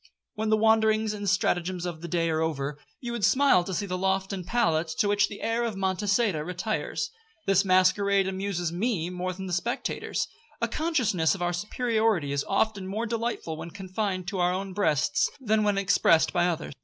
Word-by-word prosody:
When 220 -1 -2
the 215 - +4
wanderings 220 0 +3
and 205 -1 -2
stratagems 180 -1 0
of 170 -3 -5
the 170 - -5
day 170 0 0
are 160 0 0
over, 145 -2 -2 0.2
you 240 -2 -4
would 235 -3 -4
smile 270 -9 +4
to 190 - -6
see 190 +3 -1
the 185 -1 -3
loft 190 +1 0
and 190 -2 -4
pallet 170 -6 +1
to 205 - +2
which 205 0 +3
the 205 - -9
heir 230 +1 0
of 230 -3 -2
Monçada 195 -2 0
retires. 215 - -3 0.3
This 195 0 +4
masquerade 195 +1 +3
amuses 190 -3 -2
me 180 -2 -1
more 180 0 -3
than 190 +1 -7
the 180 - -4
spectators. 235 +8 -2 0.3
A - - +1
consciousness 250 - +1
of 180 - -4
our 175 0 0
superiority 215 - 0
is 140 0 0
often 205 -4 0
more 215 +4 -2
delightful 230 -8 -3
when 160 +1 -7
confined 190 0 -3
to 190 - -4
our 175 0 +3
own 190 +1 -3
breasts, 165 -8 +1
than 220 -4 +1
when 205 -1 +1
expressed 180 -4 +3
by 175 -1 +3
others. 170 -4 -3
190 Hz, 190 wpm, -27 LUFS, 175-215 Hz, 0.3 s, the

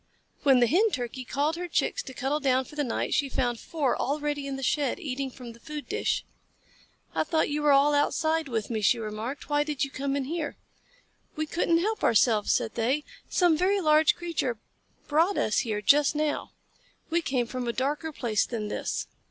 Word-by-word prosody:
When 270 -3 +5
the - - +6
Hen 380 - +3
Turkey 255 - -4
called 290 +5 -1
her 355 0 -4
Chicks - - 0
to 265 - -9
cuddle 270 +5 -1
down 260 -2 +2
for 295 - -13
the 295 - 0
night, 240 - -2
she 280 -2 +1
found 240 -3 -1
four 290 -7 -1
already 290 0 -2
in 275 - -3
the 270 - -6
shed, 285 +5 0
eating 275 -5 -3
from 245 -2 -10
the 235 - -17
food 300 +2 -7
dish. 440 +4 -1 0.9
"I - - +1
thought 315 -1 0
you 300 +1 -1
were 295 -1 +4
all 280 +1 +5
outside 315 +2 +1
with 230 -3 -3
me," 220 -2 -1
she 235 - +4
remarked. 220 +5 -5
"Why 290 0 +2
did 295 -2 -2
you 275 - -3
come 275 +1 -2
in 280 - 0
here?" 310 +2 -4 0.8
"We 310 - -1
couldn't 335 +1 +1
help 435 +4 -1
ourselves," 220 -2 +3
said 220 - 0
they. 255 +6 0 0.3
"Some 350 -3 +3
very 380 +5 +2
large 310 -3 +4
creature 330 -9 -2 0.5
brought 330 +6 +2
us 215 - +2
here 215 -4 -2
just 290 +5 +4
now. 300 0 -1 0.6
We 340 +1 +2
came 260 -6 0
from 250 +1 -4
a - - +1
darker 290 +6 -2
place 235 -7 0
than 215 -3 -4
this." - - -2
285 Hz, 200 wpm, -27 LUFS, 250-310 Hz, 0.9 s, the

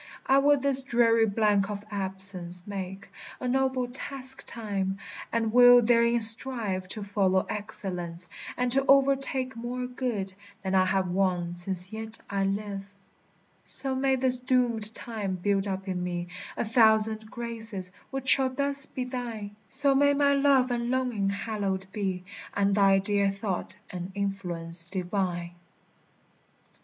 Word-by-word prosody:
I 270 +1 +4
will 290 +1 +4
this 270 0 +2
dreary 230 -3 +2
blank 205 -1 +1
of 205 0 -6
absence 190 -3 -2
make 195 -1 -7 0.3
A 255 - -4
noble 260 0 0
task 265 +1 -7
time; 195 -4 -4 0.3
and 225 -1 -1
will 245 0 +8
therein 235 +1 +3
strive 220 -5 +7
To 210 +2 -7
follow 195 -2 0
excellence, 180 -4 -5 0.3
and 250 0 -1
to 270 +2 +2
o'ertake 270 -2 +2
More 245 +2 -5
good 245 -6 -4 0.3
than 190 0 -3
I 185 -1 +4
have 190 0 0
won 180 -2 -1
since 180 +2 +3
yet 220 0 -7
I 195 -1 0
live. 200 0 -3 0.8
So 270 -1 -3
may 265 0 +1
this 255 -1 0
doomèd 245 -4 0
time 210 -5 -5
build 195 +2 -1
up 190 0 -5
in 180 -1 -3
me 175 -1 -4 0.3
A - - -1
thousand 220 -1 +2
graces, 225 -6 -4 0.2
which 270 -1 -6
shall 265 0 +8
thus 280 +1 +2
be 255 - -5
thine; 235 -5 -6
So 280 0 +1
may 285 +1 +3
my 280 0 +3
love 275 -2 +3
and 235 0 -2
longing 245 -6 -1
hallowed 200 -2 -3
be, 190 -3 -3 0.3
And 200 0 +1
thy 195 -1 +4
dear 200 0 +1
thought 195 -2 -4 0.2
an 180 +1 -6
influence 175 -4 -1
divine. 180 -1 -3
215 Hz, 145 wpm, -27 LUFS, 190-250 Hz, 0.8 s, will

